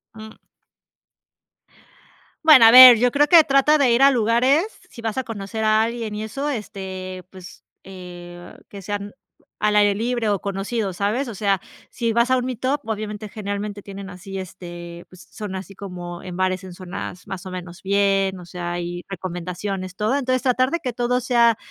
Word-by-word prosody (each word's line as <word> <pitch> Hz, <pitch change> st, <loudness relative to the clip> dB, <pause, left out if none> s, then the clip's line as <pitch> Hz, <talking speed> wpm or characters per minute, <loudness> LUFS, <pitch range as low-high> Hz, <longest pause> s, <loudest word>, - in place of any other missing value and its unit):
Mm. 220 Hz, 0 st, -11 dB, 2.1 s
Bueno, 295 Hz, -7 st, +9 dB
a -, -, +9 dB
ver, 250 Hz, -1 st, +11 dB
yo 250 Hz, +1 st, +3 dB
creo 290 Hz, +3 st, +3 dB
que 335 Hz, -1 st, +8 dB
trata 280 Hz, +2 st, +3 dB
de 270 Hz, -3 st, +4 dB
ir 235 Hz, +3 st, +4 dB
a 275 Hz, -, +7 dB
lugares, 255 Hz, -, +2 dB, 0.2 s
sí 235 Hz, -, -11 dB
vas 225 Hz, 0 st, -3 dB
a 260 Hz, -, 0 dB
conocer 220 Hz, -1 st, -5 dB
a 215 Hz, 0 st, +3 dB
alguien 230 Hz, -1 st, -3 dB
y 210 Hz, -, -5 dB
eso 270 Hz, +7 st, -4 dB
este, 190 Hz, -5 st, -6 dB
pues, 185 Hz, -1 st, -13 dB, 0.2 s
eh, 175 Hz, -2 st, -11 dB, 0.2 s
que 200 Hz, -1 st, -10 dB
sean 205 Hz, +1 st, -5 dB, 0.4 s
al 210 Hz, 0 st, +1 dB
aire 205 Hz, -1 st, +4 dB
libre 235 Hz, +1 st, -1 dB
o 200 Hz, -2 st, 0 dB
conocidos, 200 Hz, 0 st, -3 dB
¿sabes?, 220 Hz, +7 st, -1 dB
o 235 Hz, -, -6 dB
sea, 200 Hz, -1 st, 0 dB, 0.3 s
si 230 Hz, -1 st, -2 dB
vas 235 Hz, +2 st, +2 dB
a 260 Hz, -, +3 dB
un 250 Hz, -, -2 dB
meetup, 255 Hz, +3 st, -2 dB
obviamente 215 Hz, -1 st, -5 dB
generalmente 205 Hz, 0 st, -5 dB
tienen 195 Hz, 0 st, -9 dB
así 195 Hz, +1 st, -8 dB
este 175 Hz, -2 st, -9 dB
pues 185 Hz, 0 st, -15 dB
son 210 Hz, -3 st, -6 dB
así 190 Hz, +1 st, -8 dB
como 175 Hz, -3 st, -8 dB
en 180 Hz, -2 st, -8 dB
bares, 185 Hz, 0 st, -1 dB
en 185 Hz, -, -9 dB
zonas 180 Hz, 0 st, -8 dB
más 195 Hz, -2 st, -7 dB
o -, -, -7 dB
menos 180 Hz, -1 st, -8 dB
bien, 195 Hz, -1 st, +1 dB
o 175 Hz, -, -11 dB
sea, 175 Hz, 0 st, -5 dB
y 175 Hz, 0 st, -5 dB
recomendaciones, 185 Hz, +1 st, -5 dB
todo 215 Hz, +7 st, 0 dB
entonces 255 Hz, -2 st, -1 dB
tratar 255 Hz, 0 st, +2 dB
de 340 Hz, -, -1 dB
que 255 Hz, -, -2 dB
todo 245 Hz, +1 st, 0 dB
sea, 235 Hz, -2 st, +3 dB
205 Hz, 180 wpm, -22 LUFS, 185-235 Hz, 2.1 s, ver